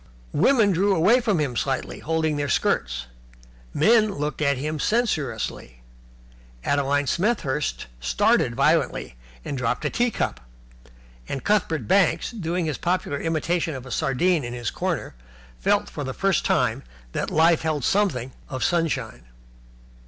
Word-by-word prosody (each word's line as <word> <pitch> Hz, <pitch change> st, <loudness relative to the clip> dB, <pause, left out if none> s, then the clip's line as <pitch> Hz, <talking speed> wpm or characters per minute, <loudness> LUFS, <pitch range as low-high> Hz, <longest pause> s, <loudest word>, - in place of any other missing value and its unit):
Women 215 Hz, -, +4 dB
drew 195 Hz, +3 st, +2 dB
away 195 Hz, +10 st, +5 dB
from 210 Hz, -5 st, +1 dB
him 140 Hz, -5 st, -1 dB
slightly, 135 Hz, +2 st, -2 dB
holding 160 Hz, -1 st, 0 dB
their 145 Hz, -1 st, -2 dB
skirts. -, -, 0 dB, 0.7 s
Men 215 Hz, +5 st, +4 dB
looked 150 Hz, +1 st, -3 dB
at 140 Hz, -2 st, +2 dB
him 155 Hz, +3 st, -3 dB
censoriously. 135 Hz, -, -2 dB, 0.8 s
Adeline 145 Hz, 0 st, +1 dB
Smethurst 160 Hz, -, -1 dB
started 60 Hz, -, +2 dB
violently, 140 Hz, -, +1 dB, 0.3 s
and -, -, -3 dB
dropped 125 Hz, -2 st, -1 dB
a -, -, 0 dB
tea 245 Hz, 0 st, +1 dB
cup. 60 Hz, -, -2 dB, 0.9 s
And 135 Hz, -, -4 dB
Cuthbert 200 Hz, -6 st, +1 dB
Banks, 195 Hz, +5 st, +2 dB
doing 180 Hz, -5 st, -2 dB
his 155 Hz, -4 st, -3 dB
popular 175 Hz, -5 st, -1 dB
imitation 165 Hz, 0 st, -1 dB
of 130 Hz, -1 st, -7 dB
a 130 Hz, -, -9 dB
sardine 155 Hz, +6 st, +1 dB
in 120 Hz, 0 st, -5 dB
his 120 Hz, -2 st, -3 dB
corner, -, -, -3 dB, 0.5 s
felt -, -, +2 dB
for -, -, -6 dB
the -, -, -5 dB
first -, -, +1 dB
time -, -, +1 dB, 0.3 s
that -, -, -2 dB
life 165 Hz, +1 st, +4 dB
held 155 Hz, -4 st, -1 dB
something 155 Hz, -, +1 dB, 0.2 s
of 130 Hz, -1 st, -3 dB
sunshine. 165 Hz, -, -1 dB
155 Hz, 140 wpm, -24 LUFS, 130-180 Hz, 0.9 s, away